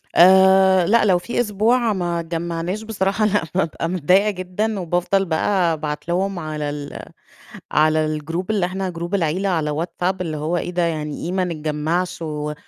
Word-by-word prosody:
آآ، 190 0 +6
لأ، 230 +4 +3
لو 185 -3 +4
في 235 +8 -4
أسبوع 225 +1 +2
ما 175 -3 -2
اتجمعناش، 170 +4 -3
بصراحة 215 -1 0
لأ، 205 -4 +1
بابقى 165 -2 -1
متضايِّقة 185 +4 +3
جدًا، 195 +3 -3
وبافضل 180 +2 0
بقى 170 +1 +1
أبعت 150 -1 -5
لهم 185 +2 -1
على 155 -2 -4
ال 145 -1 -7 0.7
على 155 0 +3
الجروب 165 +5 -3
اللي 200 -4 +1
إحنا 190 +1 -3
جروب 170 +2 -4
العيلة 185 +2 0
على 160 -4 0
واتساب، 180 +4 -2
اللي 160 -4 -3
هو: 155 +4 -1
"إيه 175 - -3
ده 175 0 -1
يعني 155 -3 -3
إيه 175 - -3
ما 185 0 0
نتجمِّعش؟ 165 +2 -2
و 150 -2 -4
175 Hz, 165 wpm, -21 LUFS, 160-190 Hz, 0.7 s, آآ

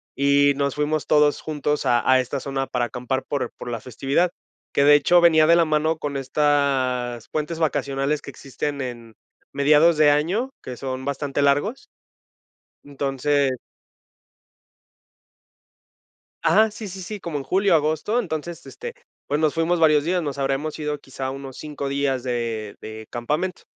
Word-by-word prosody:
y 140 +1 +4
nos 140 -1 -1
fuimos 150 +1 -1
todos 150 -1 +3
juntos 150 -1 -2
a 120 -1 +2
a 130 - +6
esta 130 +2 -2
zona 135 0 -3
para 125 -1 -1
acampar 125 +2 -3
por 135 -4 -2
por 120 - -7
la 115 -2 -4
festividad, 140 +8 0 0.4
que 140 - +3
de 145 +1 +7
hecho 175 +4 +4
venía 160 -2 +6
de 170 - +6
la 170 -1 +4
mano 155 +1 +1
con 145 -3 -4
estas 135 -4 0
puentes 155 +2 -3
vacacionales 140 -1 0
que - - -9
existen 140 +2 -5
en 120 -3 -7 0.4
mediados 150 +3 +4
de 150 -1 +6
año, 180 - 0
que 125 -1 -7
son 130 0 -5
bastante 140 0 -2
largos. 145 - +1 0.9
Entonces. 140 -1 0 2.8
Ajá, 220 +1 +4
sí, 210 0 -8
sí, 190 +1 -8
sí, 210 +3 -6
como 170 -5 -4
en 135 - -6
julio 190 +6 +2
o - - +8
agosto. 155 +9 0
Entonces 170 -4 -5
este, 475 0 -8 0.3
pues 145 +2 -1
nos 155 -2 +2
fuimos 165 +1 +1
varios 155 -2 +4
días, 180 +2 0
nos 145 -3 -4
habremos 140 +3 -2
ido 150 -1 -3
quizá 135 -1 -6
unos 135 -1 -8
5 150 -2 -5
días 135 -2 -1
de 115 -4 -3
de 110 0 -9
campamento. 150 +10 -2
145 Hz, 160 wpm, -23 LUFS, 135-155 Hz, 2.8 s, o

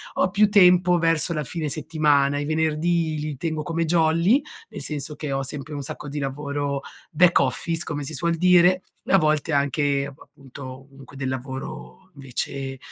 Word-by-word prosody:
Ho - - +2
più 205 +2 +3
tempo 180 -3 +5
verso 165 0 +1
la 150 -2 -2
fine 155 +3 -4
settimana. 145 -2 +1
I 145 - -3
venerdì 160 +1 0
li 150 -2 -4
tengo 155 +1 -3
come 165 +2 -1
jolly, 170 - +3 0.3
nel - - -8
senso 150 0 -4
che 150 -1 -5
ho 135 0 -1
sempre 145 +2 -6
un - - -5
sacco 145 - -7
di 145 +1 -4
lavoro 140 0 -3 0.3
back 175 +2 +5
office, 160 +5 -1
come 145 -1 -4
si 145 +3 -6
suol 170 +3 0
dire, 180 +1 +5 0.2
e - - -1
a - - +8
volte 155 -2 +1
anche, 140 0 +1
appunto, 135 -2 -12
comunque 135 -1 -15
del 135 -1 -2
lavoro 130 - -7
invece 135 0 -5
150 Hz, 170 wpm, -23 LUFS, 140-165 Hz, 0.3 s, a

